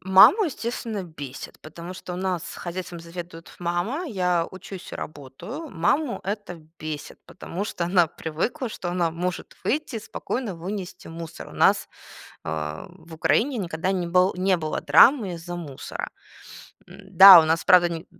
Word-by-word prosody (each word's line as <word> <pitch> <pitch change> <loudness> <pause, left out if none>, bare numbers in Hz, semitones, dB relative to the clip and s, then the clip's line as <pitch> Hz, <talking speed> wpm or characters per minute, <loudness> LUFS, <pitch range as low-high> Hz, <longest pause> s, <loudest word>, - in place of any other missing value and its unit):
Маму, 190 - +7
естественно, 235 - -4
бесит, 145 -6 -9
потому 170 +3 -9
что 180 -1 -7
у - - -5
нас 185 -2 -3
хозяйством 175 -1 -6
заведует 170 0 -9
мама, 175 - -2
я 180 - 0
учусь 190 0 -10
и - - -4
работаю. 155 - -8
Маму 240 - 0
это 205 -1 -4 0.2
бесит, 155 -1 -6
потому 185 +2 -6
что 175 - -3
она 175 -1 +3
привыкла, 160 - -3
что 180 -4 -5
она 175 -2 0
может 175 +2 -4
выйти 290 -2 -1
и - - -2
спокойно 225 0 -4
вынести 185 +2 -7
мусор. 165 0 -8
У - - -14
нас, - - +3 0.6
а, 75 0 -4
в 165 0 -14
Украине 240 - +1
никогда 175 -1 -2
не 180 -2 -1
был 180 +2 +3
не 185 +1 +2
было 155 -2 -3
драмы 200 - +5
из-за 175 +1 -7
мусора. 150 -6 -6 0.8
М-да, 190 -1 +9
у - - +1
нас, 160 +1 +1
правда, 175 -1 +6
ни 170 0 -6
180 Hz, 155 wpm, -24 LUFS, 165-195 Hz, 0.8 s, М-да